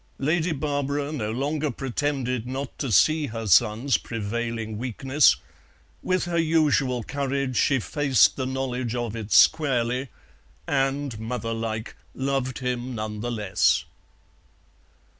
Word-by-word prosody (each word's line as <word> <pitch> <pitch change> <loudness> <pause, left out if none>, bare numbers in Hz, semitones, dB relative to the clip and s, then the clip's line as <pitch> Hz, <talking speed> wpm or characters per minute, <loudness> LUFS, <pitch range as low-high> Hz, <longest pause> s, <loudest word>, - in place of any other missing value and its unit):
Lady 160 +4 +1
Barbara 145 -1 -2
no 110 -8 -3
longer 145 +5 -1
pretended 125 -1 -2
not 130 +1 -5
to 135 -5 -2
see 155 - +4
her 115 -1 -5
son's 110 - +3
prevailing 115 0 -4
weakness; 130 +4 +3 0.7
with 185 -1 0
her 170 -1 0
usual 150 -6 +2
courage 140 0 -2
she 135 +2 +3
faced 130 +4 +3
the 130 -1 -2
knowledge 130 -2 -2
of 120 -2 -3
it 110 -2 -6
squarely, 130 -3 +3 0.6
and, 135 -3 -1
mother 115 0 -3
like, 110 0 -4 0.2
loved 135 -1 -1
him 125 0 -3
none 105 -1 -4
the 120 +3 -3
less. 95 -8 +1
130 Hz, 120 wpm, -25 LUFS, 115-140 Hz, 0.7 s, see